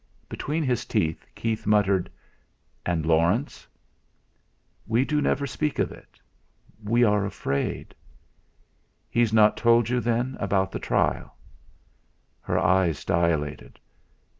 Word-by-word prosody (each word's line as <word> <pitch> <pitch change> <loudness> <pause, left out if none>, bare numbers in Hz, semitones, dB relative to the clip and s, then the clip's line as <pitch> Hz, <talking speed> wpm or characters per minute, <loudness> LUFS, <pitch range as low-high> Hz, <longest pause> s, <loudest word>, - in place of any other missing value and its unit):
Between 155 +3 -3
his 125 -4 0
teeth 80 -1 -2
Keith 110 -2 -3
muttered: 100 -3 +2 0.8
"And 85 -3 0
Laurence?" 85 - +1 1.2
"We 115 +4 +2
do 150 0 0
never 140 - 0
speak 150 +2 -2
of - - 0
it, - - -16 0.6
we 115 +4 +2
are 105 -3 +3
afraid." 70 -8 -3 1.2
"He's 120 -2 +2
not 110 -1 +5
told 115 -1 +3
you, 125 0 +1
then, 120 +2 -1
about 95 -1 0
the - - -4
trial?" - - -1 1.0
Her - - -2
eyes 90 -5 +2
dilated. 80 -3 -1
105 Hz, 115 wpm, -25 LUFS, 90-120 Hz, 1.2 s, not